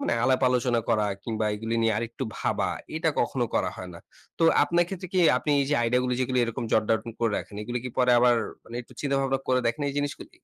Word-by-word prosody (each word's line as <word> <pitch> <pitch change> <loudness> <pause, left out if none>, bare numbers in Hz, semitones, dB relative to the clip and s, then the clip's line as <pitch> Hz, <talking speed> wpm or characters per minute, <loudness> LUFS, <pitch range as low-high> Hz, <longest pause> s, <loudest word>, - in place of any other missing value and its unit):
মানে - - -1
আলাপ 130 0 +3
আলোচনা 125 -1 +1
করা 105 -1 +2 0.2
কিংবা 110 -2 -2
এগুলি 115 +2 -3
নিয়ে 115 0 +3
আরেকটু 115 +3 -4
ভাবা - - 0 0.3
এটা 160 +1 0
কখনো 120 +1 0
করা 90 - +1
হয় 95 - -7
না। - - -9 0.4
তো - - 0 0.2
আপনার 175 0 +2
ক্ষেত্রে 185 -1 -6
কি 185 - +1 0.2
আপনি 150 - -2
এই - - +2
যে, 150 - +3
আইডিয়াগুলি 125 +2 +1
যেগুলি 130 0 0
এরকম 115 +1 -4
জট 110 - +4
ডাউন 115 +1 0
করে 115 -2 +1
রাখেন, - - -9
এগুলো 120 +3 -3
কি - - -2
পরে 125 -1 +4
আবার 120 0 +5 0.3
মানে 115 - -8
একটু - - -18
চিন্তাভাবনা 135 -1 0
করে 130 0 +3
দেখেন 115 +5 -1
এই - - -9
জিনিসগুলি? 145 0 -5
125 Hz, 225 wpm, -26 LUFS, 115-135 Hz, 0.4 s, আবার